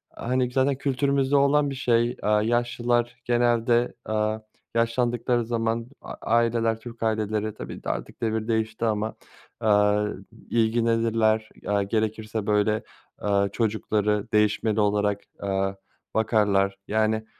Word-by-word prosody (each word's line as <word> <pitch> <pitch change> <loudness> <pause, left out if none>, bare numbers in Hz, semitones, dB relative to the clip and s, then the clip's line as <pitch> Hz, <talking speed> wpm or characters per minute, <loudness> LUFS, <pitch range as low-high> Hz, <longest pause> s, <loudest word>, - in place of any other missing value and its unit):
hani, 125 +1 -1
zaten 135 +2 +2
kültürümüzde 140 0 +1
olan 140 +1 +4
bir 135 - -4
şey, 120 -2 +1
aaa, 105 0 +2
yaşlılar 120 +1 0
genelde, 120 0 +2
aaa, 110 0 0 0.4
yaşlandıkları 120 +1 +1
zaman 115 0 -1 0.2
a - - -8
aileler, 115 -1 +1
Türk 115 0 -9
aileleri, 110 -1 -1
tabii - - -7
ki - - -14
de - - -3
artık - - -5
devir 110 -1 -1
değişti 110 0 -1
ama, 110 0 -1 0.4
aaa, 105 -1 +3 0.4
ilgilenirler. 115 -1 +2 0.2
Aaa, 100 -1 +2
gerekirse 110 0 -2
böyle, 105 +1 +2 0.4
aaa, 100 -1 +1
çocukları 105 -1 0
değişmeli 105 0 +2
olarak, 105 -1 +1 0.2
aaa, 95 0 -1 0.4
bakarlar, 100 -3 +2
yani, 110 +1 +1
110 Hz, 120 wpm, -25 LUFS, 105-120 Hz, 0.4 s, olan